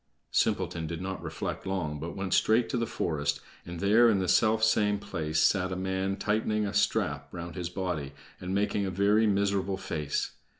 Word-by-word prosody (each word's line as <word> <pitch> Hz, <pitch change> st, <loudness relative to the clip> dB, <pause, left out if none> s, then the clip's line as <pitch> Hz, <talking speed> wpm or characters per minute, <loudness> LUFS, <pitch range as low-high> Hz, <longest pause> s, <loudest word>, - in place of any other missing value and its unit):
Simpleton 80 Hz, -2 st, 0 dB
did 85 Hz, 0 st, -5 dB
not 95 Hz, +1 st, -4 dB
reflect -, -, -5 dB
long, 80 Hz, -6 st, -2 dB
but 80 Hz, +3 st, -6 dB
went 95 Hz, -1 st, -2 dB
straight 115 Hz, +2 st, +3 dB
to -, -, -1 dB
the 115 Hz, -1 st, -1 dB
forest, 75 Hz, -5 st, -1 dB, 0.3 s
and 85 Hz, -1 st, -6 dB
there 110 Hz, +5 st, +5 dB
in 105 Hz, -, +3 dB
the 95 Hz, -1 st, -1 dB
self 110 Hz, +5 st, +3 dB
same 105 Hz, -2 st, +3 dB
place 80 Hz, -6 st, -2 dB
sat 95 Hz, +3 st, +3 dB
a -, -, -2 dB
man 95 Hz, +1 st, -1 dB
tightening 105 Hz, +1 st, 0 dB
a 100 Hz, -, -3 dB
strap 105 Hz, -, 0 dB
round 85 Hz, 0 st, -6 dB
his 90 Hz, -2 st, -4 dB
body, 90 Hz, -7 st, -3 dB, 0.3 s
and 90 Hz, +1 st, -3 dB
making 100 Hz, 0 st, +1 dB
a 95 Hz, -, -1 dB
very 100 Hz, +4 st, +3 dB
miserable 100 Hz, -1 st, +1 dB
face. 75 Hz, -6 st, -2 dB
95 Hz, 185 wpm, -29 LUFS, 85-105 Hz, 0.3 s, there